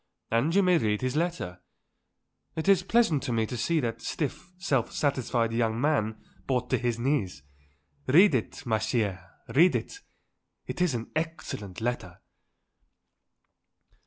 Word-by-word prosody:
"And 135 +10 +2
you 200 - +5
may 180 -2 +4
read 105 -2 0
his 130 +1 -1
letter. 160 - -2 1.0
It 160 - -3
is 195 -2 +5
pleasant 195 - +2
to - - -3
me 115 -1 +1
to 125 - -5
see 165 +7 +1
that 115 -2 -3
stiff, 155 +7 -4
self 145 - 0
satisfied 125 -5 0
young 115 -1 0
man 125 -7 +1 0.3
brought 125 -2 -1
to - - +2
his 120 -2 -1
knees. 115 - -1 0.6
Read 180 +7 +6
it, 120 -4 -2
ma 110 -3 +1
chère, 110 -4 -1 0.3
read 170 +6 +5
it. 405 - -4 0.7
It - - -5
is 175 -8 +2
an 115 -1 -5
excellent 155 - -4
letter." 110 -7 -3
125 Hz, 145 wpm, -28 LUFS, 110-160 Hz, 1.0 s, Read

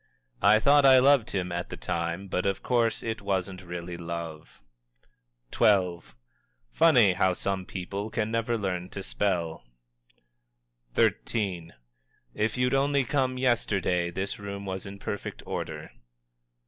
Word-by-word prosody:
"I 105 +3 +6
thought 145 +5 +5
I 135 -1 +8
loved 135 -2 +5
him 90 -2 -2
at 85 0 -3
the - - -7
time, 85 +3 -3
but 90 0 -1
of 95 - -2
course 120 -2 +1
it 110 -2 -3
wasn't 95 -1 -2
really 85 -1 -6
love." 85 -2 -7 1.0
XII. 90 -4 +3 0.7
"Funny 90 +10 +5
how 95 0 +2
some 95 0 -3
people 100 +3 -5
can 110 0 -2
never 115 +1 0
learn 90 -3 -3
to 100 - -7
spell!" 85 -7 -1 1.3
XIII. 95 -7 0 0.6
"If 110 +3 -1
you'd 125 +1 +1
only 140 0 +2
come 130 -1 0
yesterday, 100 -8 +1
this 95 +4 -4
room 100 0 -6
was 95 0 -5
in 100 0 -8
perfect 100 0 -6
order." - - -5
100 Hz, 135 wpm, -27 LUFS, 90-115 Hz, 1.3 s, I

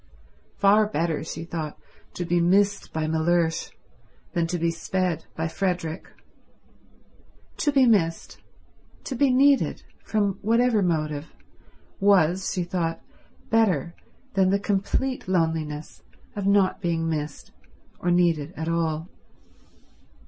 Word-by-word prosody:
Far 205 +2 +5
better, 165 -5 -1
she 160 0 -6
thought, 160 -3 -5 0.4
to 175 - -3
be 175 0 +1
missed 200 +3 +2
by 160 -1 -2
Mellersh 160 +1 +1 0.6
than 170 -1 +1
to 175 - -2
be 170 0 +1
sped 175 -1 -2
by 160 +1 -1
Frederick. 175 -2 -2 1.5
To 295 - +1
be 270 -2 +5
missed, 170 -8 +1 0.6
to - - -4
be 275 +2 +3
needed, 275 +2 +3 0.2
from 205 -3 0
whatever 230 +1 +3
motive, 155 -4 -1 0.7
was, 190 -2 +3
she 180 - -1
thought, 170 -2 -2 0.5
better 185 -9 +2 0.4
than 190 -1 +3
the 200 - +3
complete 205 +6 -1
loneliness 160 -4 -1 0.3
of 200 -1 -2
not 200 0 +3
being 165 -2 -1
missed 150 -2 -4 0.5
or 175 - -1
needed 170 -3 +2
at 160 - -4
all. 165 -1 -1
175 Hz, 120 wpm, -25 LUFS, 160-200 Hz, 1.5 s, Far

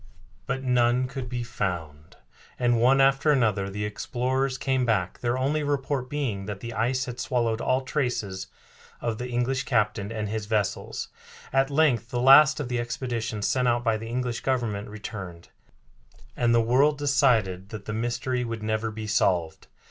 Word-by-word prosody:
But 135 - -2
none 125 0 +2
could 125 -1 -6
be 120 -1 -3
found, 85 -9 -4 0.4
and 120 -2 +2
one 130 +3 +5
after 135 +3 +4
another 105 -8 +1
the 105 +2 -3
explorers 130 +5 -1
came 130 -1 0
back, 105 -7 0
their 120 +1 0
only 140 +4 0
report 140 -2 -1
being 120 -10 -3
that 105 -2 -5
the 115 +1 -6
ice 125 +4 0
had 125 0 -7
swallowed 115 -4 0
all 130 +1 +1
traces 120 -9 -2 0.5
of 115 -2 -3
the 125 0 -4
English 125 +2 0
captain 105 -3 0
and 110 -2 -3
his 105 0 -4
vessels. 105 -2 -2 0.4
At 135 0 +3
length 140 -6 +2
the 120 - -2
last 140 +4 +7
of 145 - -3
the 125 -1 -1
expeditions 115 -3 -3
sent 125 -1 +1
out 120 0 +2
by 115 -2 +2
the 110 +1 -6
English 125 -1 -2
Government 115 -6 -2
returned, 100 -5 -8 0.9
and 120 -1 +2
the 115 0 +5
world 135 +6 +3
decided 120 -10 +2
that 110 -3 -8
the 105 - -4
mystery 120 +2 -1
would 115 -2 -5
never 110 +1 -1
be 110 0 -6
solved. 90 -6 0
120 Hz, 170 wpm, -26 LUFS, 110-130 Hz, 0.9 s, last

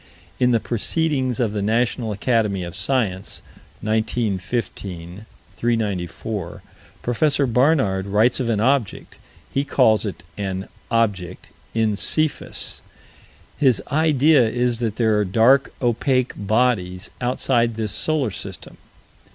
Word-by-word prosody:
In 125 - +4
the 120 -2 +3
Proceedings 130 +2 -1
of 115 -4 0
the 105 - -2
National 115 +2 0
Academy 105 -3 0
of 85 +1 -7
Science, 100 -3 -1 0.4
1915 105 -4 -3 0.3
394, 105 -4 -2 0.4
Prof. 135 +1 +1
Barnard 125 -8 +2
writes 110 +6 +3
of 125 -3 -1
an 110 -3 +1
object 125 -1 0 0.3
he 135 - +1
calls 120 -6 +3
it 100 -4 -5 0.2
an 95 -1 -3 0.2
"object" 100 -6 -1 0.3
in 110 -2 +2
Cephus. 155 +7 0 0.8
His 130 -5 +4
idea 155 -1 +4
is 120 0 0
that 115 -3 -1
there 110 -3 +2
are - - +2
dark, 115 +8 +4
opaque 130 +2 +1
bodies 105 -3 0
outside 120 -2 +1
this 110 -2 -2
solar 140 +1 0
system. - - -8
115 Hz, 115 wpm, -22 LUFS, 100-125 Hz, 0.8 s, In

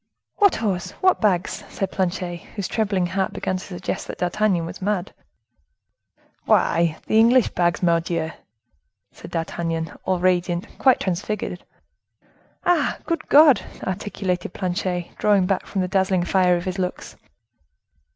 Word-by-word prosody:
"What 405 -2 +5
horse? 195 -5 -2
What 370 -1 +3
bags?" 185 -5 0
said 195 -1 -3
Planchet, 180 -1 -2 0.2
whose 200 -4 -3
trembling 200 -5 0
heart 190 +2 -1
began 185 - -2
to 185 - -8
suggest 180 -2 -5
that - - -6
D'Artagnan 180 -1 +1
was 175 +4 -8
mad. 195 -1 -1 1.3
"Why, 165 -1 +2
the 220 - +3
English 235 +1 +5
bags, 175 0 0
Mordioux!" 170 -1 +1 0.8
said - - -12
D'Artagnan, 165 0 -3
all 185 -1 +1
radiant, 175 -1 +1
quite 260 -2 +4
transfigured. 185 0 -3 1.0
"Ah! 355 -1 +2
good 335 -2 -2
God!" 290 -2 +7 0.2
articulated 190 -2 -3
Planchet, 180 -1 -2
drawing 205 -3 +3
back 190 0 0
before 195 -2 -2
the - - -1
dazzling 190 -1 +1
fire 180 -1 +3
of 175 - -6
his 185 0 -3
looks. 180 -1 -4
185 Hz, 135 wpm, -23 LUFS, 175-205 Hz, 1.3 s, God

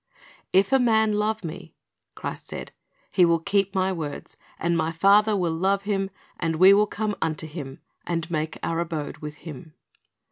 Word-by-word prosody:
"If 195 +1 +4
a 270 - +5
man 220 -3 +3
love 215 +1 0
Me," 165 -2 -8 0.4
Christ - - -6
said, - - -7 0.4
"he 185 - +4
will 170 -1 +5
keep 195 +3 0
My 190 0 +1
words; 150 -5 -6 0.2
and 170 +1 0
My 160 0 0
Father 200 +5 +4
will 175 -3 0
love 195 +4 +1
him, 195 -1 -1 0.3
and 165 -2 0
we 185 +4 +8
will 210 +1 +4
come 210 0 -2
unto 160 0 -1
him, 145 -4 -8 0.3
and 170 0 -2
make 155 -1 -2
our 165 0 -1
abode 165 -3 -3
with 150 -1 -7
him." 155 0 -9
175 Hz, 175 wpm, -25 LUFS, 160-200 Hz, 0.4 s, we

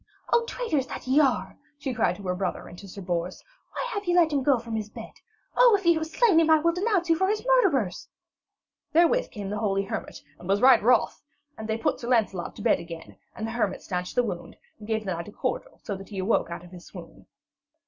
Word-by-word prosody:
'O 470 - +5
traitors 340 - -2
that - - -7
ye 260 +3 +3
are,' 240 -10 +1 0.2
she 275 -2 -4
cried 220 -6 +1
to 200 - -12
her 180 -1 -1
brother 180 0 -3
and - - -11
to 200 - -11
Sir 195 +1 -9
Bors, 175 0 -3 0.3
'why - - -3
have 410 -2 -3
ye 350 0 +1
let 330 -3 +4
him 280 - +2
go 265 -1 +3
from 230 -1 -6
his 215 -1 -3
bed? - - -9 0.4
Oh, - - +6
if 390 - -14
ye 340 - +6
have 315 -1 -2
slain 380 0 +4
him 325 -1 +3
I 315 - +7
will 335 +2 +2
denounce 375 -1 0
you 330 - +4
for 380 +3 +1
his 425 +4 -1
murderers.' 340 - +2 0.8
Therewith 345 +10 +3
came 205 -4 -6
the 210 - -2
holy 195 -2 0
hermit 195 - -6 0.2
and 175 - -10
was 200 +1 +3
right 255 +2 +6
wroth, 240 +1 +2 0.3
and 220 - -7
they 220 - 0
put 225 - -1
Sir 235 - -6
Lancelot 215 -8 0
to - - -9
bed 225 -5 +3
again, 165 -1 -10 0.2
and 220 - -4
the 225 - -4
hermit 235 0 -1
stanched 180 -1 -4
the 245 - +3
wound - - -6 0.2
and 210 - -11
gave 220 -1 -1
the 190 - -1
knight 170 0 -6
a - - -9
cordial, - - -4
so 205 - -4
that 195 +1 -10
he 205 - -8
awoke 190 -1 +1
out 170 0 -6
of 175 - -15
his 180 -1 -12
swoon. - - -12
230 Hz, 245 wpm, -26 LUFS, -, 0.8 s, I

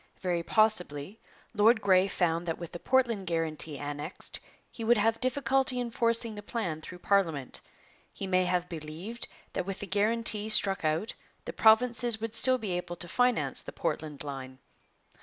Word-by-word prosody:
Very 175 -2 -1
possibly 195 -3 0 0.3
Lord 220 +2 +5
Grey 190 -2 +4
found 175 -2 0
that 165 - -1
with 170 -2 -8
the 175 - -7
Portland 235 -6 +1
guarantee 160 -3 -1
annexed 145 +4 -6 0.3
he 230 - -7
would 235 +1 +4
have 225 +2 +2
difficulty 255 0 +1
in 240 -1 -3
forcing 230 -1 0
the 205 - -7
plan 195 -8 -3
through 180 +3 -9
parliament. 165 -10 +1 0.5
He - - -6
may 185 -1 +2
have 180 0 0
believed 170 +8 -5 0.3
that 180 - -3
with 195 -1 -3
the - - -5
guarantee 215 +2 +1
struck 195 -3 +4
out 160 +8 0 0.3
the - - -5
provinces 235 +1 +4
would 225 0 -4
still 255 +2 +4
be 215 -6 -4
able 175 0 -3
to 175 - -8
finance 245 +7 +1
the - - -9
Portland 150 -3 -3
line. 135 -2 -7
195 Hz, 165 wpm, -29 LUFS, 170-230 Hz, 0.5 s, Lord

